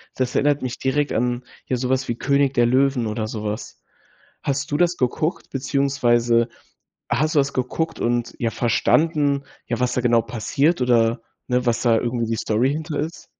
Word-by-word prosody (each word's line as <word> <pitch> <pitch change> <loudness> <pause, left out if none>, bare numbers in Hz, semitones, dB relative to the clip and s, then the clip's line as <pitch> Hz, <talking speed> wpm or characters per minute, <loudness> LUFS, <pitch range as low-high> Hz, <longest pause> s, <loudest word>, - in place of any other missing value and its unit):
Das 125 -1 -2
erinnert 145 0 +2
mich 125 -1 -4
direkt 145 +2 0
an, 125 +1 0 0.2
ja, 130 - -1
so 125 0 -2
was 130 +1 0
wie 120 - -1
König 140 0 +2
der 120 -3 +3
Löwen 130 -1 +2
oder 110 0 -2
so 110 -1 -5
was. 105 +2 -5 0.6
Hast 135 0 -1
du 145 - +1
das 175 +2 +2
geguckt, 155 +7 -1
beziehungsweise 120 -4 +1 0.6
hast 155 +6 +1
du - - +7
das 140 0 -1
geguckt 160 +6 -2
und, 120 0 -1
ja, 115 - 0
verstanden, 145 +5 +2 0.2
ja, 120 0 -2
was 125 0 +1
da - - +1
genau 120 -1 +3
passiert 125 - 0
oder, 115 -2 +2 0.3
ne, 125 0 0
was 120 -1 +1
da 115 -2 +4
irgendwie 120 0 -1
die 115 0 -1
Story 110 +4 +1
hinter 155 0 -3
ist? 160 +3 -6
125 Hz, 185 wpm, -22 LUFS, 120-140 Hz, 0.6 s, du